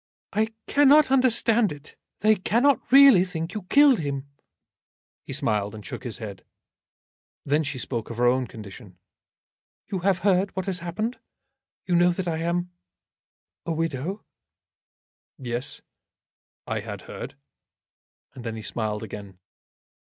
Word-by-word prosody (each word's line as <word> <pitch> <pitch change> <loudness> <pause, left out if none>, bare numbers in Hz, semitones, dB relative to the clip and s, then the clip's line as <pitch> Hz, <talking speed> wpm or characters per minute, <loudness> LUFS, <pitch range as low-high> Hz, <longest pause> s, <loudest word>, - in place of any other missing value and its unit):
"I 215 +1 +2 0.2
cannot 290 0 +5
understand 235 -5 +3
it. 145 0 -11 0.3
They 215 +1 +5
cannot 240 +10 +1
really 270 -8 +8
think 170 -2 -5
you 215 - -4
killed 285 -4 +6
him." 140 -2 -3 1.0
He - - -6
smiled, 105 -1 -1
and 105 -2 -10
shook - - -7
his 120 -4 -4
head. 105 -4 -8 1.0
Then 145 +2 +2
she 140 -3 -4
spoke 120 -3 -4
of 115 - -7
her 125 - +2
own 125 +1 +2
condition. 105 -3 -11 0.9
"You 190 - -1
have 190 +1 +2
heard 195 0 +2
what 190 - -2
has 190 -2 -1
happened? 215 +8 -3 0.7
You 180 - -1
know 175 +1 +5
that 180 0 -4
I 165 -2 -1
am 175 +2 -1 0.9
a 165 - -2
widow?" 165 +4 -3 1.1
"Yes; 120 -2 -5 0.8
I - - -2
had - - -7
heard." - - -8 1.0
And 125 - -10
then 115 -2 -4
he 110 - -7
smiled 105 -1 -3
again. 100 -3 -9
165 Hz, 135 wpm, -25 LUFS, -, 1.1 s, really